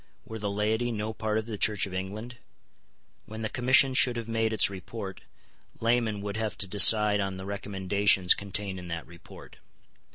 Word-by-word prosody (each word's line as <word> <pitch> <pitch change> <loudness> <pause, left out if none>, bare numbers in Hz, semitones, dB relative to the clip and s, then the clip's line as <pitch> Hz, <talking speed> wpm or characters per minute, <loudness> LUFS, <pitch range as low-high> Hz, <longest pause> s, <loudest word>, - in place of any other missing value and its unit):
Were 110 0 -8
the 105 -1 -3
laity 110 +4 -1
no 110 0 -4
part 110 0 -2
of 110 - -3
the 110 -3 -7
Church 105 -2 +2
of 95 - -10
England? 105 +6 -6 0.9
When 110 +1 -8
the 110 - -2
Commission 130 +2 +3
should 125 -1 +4
have 115 -1 -6
made 115 -1 -1
its 110 - +4
report, 100 0 -8 0.6
laymen 115 -3 0
would 100 +1 -5
have 110 -5 -4
to - - -1
decide 105 +1 +6
on 95 -1 -3
the 95 - -8
recommendations 100 -1 +1
contained 100 -1 -5
in 90 - -10
that 85 -1 -6
report. 85 0 -15
105 Hz, 175 wpm, -27 LUFS, 95-110 Hz, 0.9 s, decide